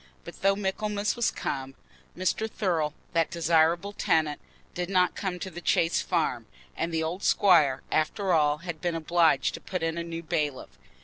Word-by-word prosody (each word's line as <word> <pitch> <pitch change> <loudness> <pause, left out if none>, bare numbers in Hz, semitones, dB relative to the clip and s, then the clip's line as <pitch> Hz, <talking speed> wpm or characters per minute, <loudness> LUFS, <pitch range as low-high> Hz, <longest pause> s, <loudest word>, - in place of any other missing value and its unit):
But - - -11
though 195 0 +4
Michaelmas 205 +1 -1
was 240 - +1
come, 135 0 -4 0.4
Mr. 185 +4 0
Thurle, 165 -9 -1 0.2
that 165 -1 +2
desirable 170 +3 +2
tenant, 155 -6 +1 0.3
did 180 0 -3
not 180 -2 +3
come 190 -3 -3
to 190 +1 -6
the 175 +1 -8
Chase 165 -1 +2
Farm, - - -1 0.3
and 170 - -2
the 160 -1 0
old 170 +4 -3
squire, 155 -9 +4
after 185 +4 +1
all, 150 -2 +3
had 170 -3 -5
been 175 -2 -1
obliged 165 0 +2
to - - -7
put 185 -3 -4
in 165 +1 -1
a - - -2
new 170 0 -6
bailiff. 150 -4 -2
170 Hz, 175 wpm, -27 LUFS, 160-190 Hz, 0.4 s, though